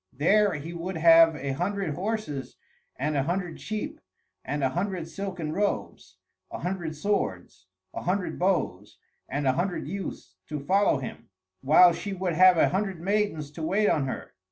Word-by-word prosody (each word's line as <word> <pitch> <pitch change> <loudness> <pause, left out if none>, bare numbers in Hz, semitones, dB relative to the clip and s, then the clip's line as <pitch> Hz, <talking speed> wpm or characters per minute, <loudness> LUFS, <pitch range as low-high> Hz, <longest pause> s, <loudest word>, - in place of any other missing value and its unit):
There 200 +5 +3
he 155 +3 -6
would 170 +1 -4
have 165 0 +7
a 140 -1 -3
hundred 180 +3 -2
horses 185 -6 -4 0.4
and 150 +3 -1
a 140 - +2
hundred 175 +3 -3
sheep 215 0 -5 0.4
and 145 +1 -3
a 135 - +3
hundred 180 +1 -3
silken 180 -4 -5
robes, 205 +2 -3 0.3
a - - -6
hundred 175 -4 -3
swords, 95 - -2 0.3
a - - -5
hundred 185 +1 -2
bows, 125 - -1 0.3
and 145 +2 -2
a 130 - +4
hundred 175 0 -2
youths 180 - -6
to 150 0 -3
follow 190 +3 +2
him; 130 -2 -8 0.3
while 170 +5 +7
she 200 +3 -5
would 185 -2 -2
have 185 +1 +6
a - - +4
hundred 190 -2 -2
maidens 190 -6 -1
to 155 - -9
wait 195 +6 +2
on 140 -3 +1
her. - - -6
170 Hz, 165 wpm, -27 LUFS, 145-195 Hz, 0.4 s, have